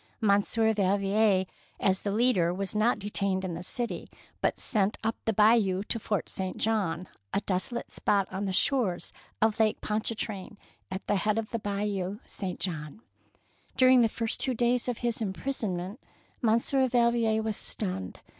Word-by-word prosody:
Monsieur 220 +1 +3
Valvier, 200 0 +2 0.3
as 190 -1 +2
the 200 - -2
leader, 210 -6 +3
was 190 +2 -2
not 220 +3 +3
detained 195 -2 -1
in 180 - -3
the 165 - -5
city, 235 +6 -4 0.3
but - - +1
sent 210 -2 +1
up 225 +1 0
the 225 - +2
Bayou 210 -3 +4
to 230 - -2
Fort 210 -1 -1
St. 190 -1 -4
John, 185 -6 0 0.3
a 200 - +2
desolate 200 +5 -1
spot 200 -2 +1
on 195 +2 -3
the 195 - -1
shores 200 -2 +1 0.3
of 220 0 +2
Lake 220 -1 +3
Pontchar 215 +1 -1
train, 205 -2 -5 0.3
at 190 0 -5
the 205 - +1
head 210 +2 +1
of 225 -1 -3
Bayou 200 -1 -2
St. 185 -3 -5
John. 155 +1 -4 0.8
During 255 -1 +7
the 230 - +4
first 225 0 -2
two 260 -2 0
days 240 +1 +1
of 245 -2 -1
his 235 -1 0
imprisonment 200 -2 -3 0.4
Monsieur 240 +3 +2
Valvier 235 -2 +2
was 220 -1 -1
stunned. 95 - -4
210 Hz, 160 wpm, -29 LUFS, 190-225 Hz, 0.8 s, During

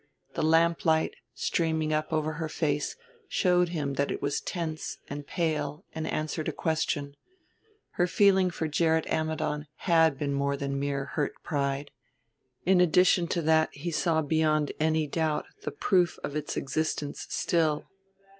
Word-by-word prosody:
The - - -2
lamplight, 160 0 +3 0.2
streaming 160 -2 0
up 155 +1 -1
over 155 -1 0
her 160 0 -4
face, 150 -2 -1 0.3
showed 180 -2 +3
him 150 -5 -2
that 140 +1 0
it - - -2
was 145 +1 -1
tense 160 -3 -4
and 145 0 -6
pale 160 -1 -2
and 160 0 -3
answered 155 +1 -2
a - - 0
question. 145 -3 -1 0.8
Her 175 - +1
feeling 190 0 +4
for 165 -2 -3
Gerrit 160 +1 +2
Ammidon 155 -1 -1
had 165 -5 +3
been 140 0 -1
more 140 0 0
than 140 0 -3
a - - -2
mere 140 0 -1
hurt 145 +2 -2
pride. 140 -2 -2 0.7
In 185 0 +5
addition 180 0 +4
to 170 0 -1
that 160 0 +4
he 165 +5 -4
saw 160 0 +1
beyond 155 -1 +2
any 155 0 +2
doubt 155 +1 -1 0.2
the - - -2
proof 175 +4 +2
of 145 - -4
its 150 - -3
existence 145 0 -2
still. 155 -3 +1
155 Hz, 155 wpm, -28 LUFS, 145-165 Hz, 0.8 s, In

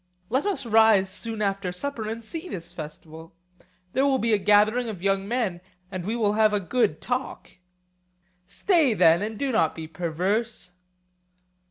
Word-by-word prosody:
Let 265 - +1
us 295 -10 -2
rise 220 -4 +4
soon 225 +1 -3
after 195 -2 -1
supper 220 +3 -4
and 225 +1 -6
see 330 +9 -5
this 175 - -7
festival; 160 0 -10 0.6
there 265 - +2
will 275 -1 +3
be 230 -2 +1
a 210 - +3
gathering 215 +4 +3
of 190 -5 -7
young 195 0 +1
men, 210 -7 -1 0.3
and 185 -2 -5
we 225 - -1
will 210 -3 +1
have 215 0 +3
a 205 - +2
good 180 -4 0
talk. 245 -7 -4 0.9
Stay 290 - +2
then, 170 -1 +5
and 215 +1 -4
do 275 +2 -1
not 165 -9 +1
be 160 -1 -7
perverse. 180 +6 -2
210 Hz, 165 wpm, -25 LUFS, 180-235 Hz, 0.9 s, then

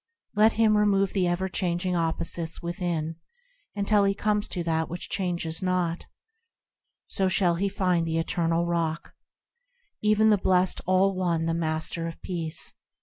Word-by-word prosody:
Let 215 +2 +4
him 220 -1 +3
remove 200 -2 +2
the 185 -3 +1
ever 175 +2 0
changing 180 -1 -1
opposites 165 0 -2
within 170 -3 -3 0.6
until 205 0 +2
he 195 0 +2
comes 210 0 0
to 175 - -3
that 160 -1 -1
which 175 +2 -4
changes 175 -4 -2
not; 180 -2 -1 1.0
So 190 - 0
shall 185 -1 +3
he 195 +4 0
find 180 -4 0
the 165 0 -1
Eternal 165 0 0
Rock, 165 -1 -2 0.9
Even 215 +1 +4
the 205 - +3
blessed 185 0 +2
All 190 +1 +3
One, 170 -3 0
the 165 - 0
Master 165 0 -2
of 165 - -8
peace. 165 -4 -1
175 Hz, 145 wpm, -26 LUFS, 165-195 Hz, 1.0 s, Let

